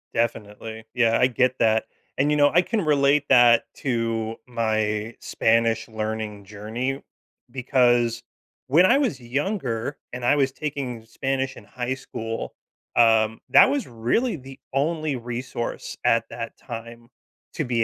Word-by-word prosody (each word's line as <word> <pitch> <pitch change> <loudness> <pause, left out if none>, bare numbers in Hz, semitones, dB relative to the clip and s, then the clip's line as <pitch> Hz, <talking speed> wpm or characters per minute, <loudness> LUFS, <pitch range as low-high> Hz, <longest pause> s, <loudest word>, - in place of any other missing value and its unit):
Definitely. 110 -1 -3
Yeah, 115 -2 +3
I 125 - +5
get 125 0 +1
that. 110 -1 +3 0.3
And, 145 +3 +2
you 150 - +2
know, 145 0 +5
I 175 - +6
can 205 0 -2
relate 145 -1 +3
that 120 -3 +6 0.2
to 115 -3 -1
my 110 -2 -1
Spanish 115 0 +1
learning 110 -2 -4
journey 110 +7 -4 0.5
because 120 -2 +2 0.4
when 160 +8 +5
I 240 +8 +5
was 245 - 0
younger 135 - -2 0.2
and 125 0 -6
I 135 +5 +3
was 135 -2 +1
taking 135 -7 -5
Spanish 135 +3 -2
in - - -12
high 125 +1 -3
school, 115 -3 -6 0.4
um, 110 -1 +4
that - - +7
was 280 -1 -1
really 125 - 0
the 135 -1 -12 0.2
only 155 0 0
resource 120 0 -5
at 115 0 +4
that 115 -1 -7
time 115 0 -9 0.5
to 155 - -1
be 120 -2 +1
120 Hz, 140 wpm, -24 LUFS, 115-135 Hz, 0.5 s, that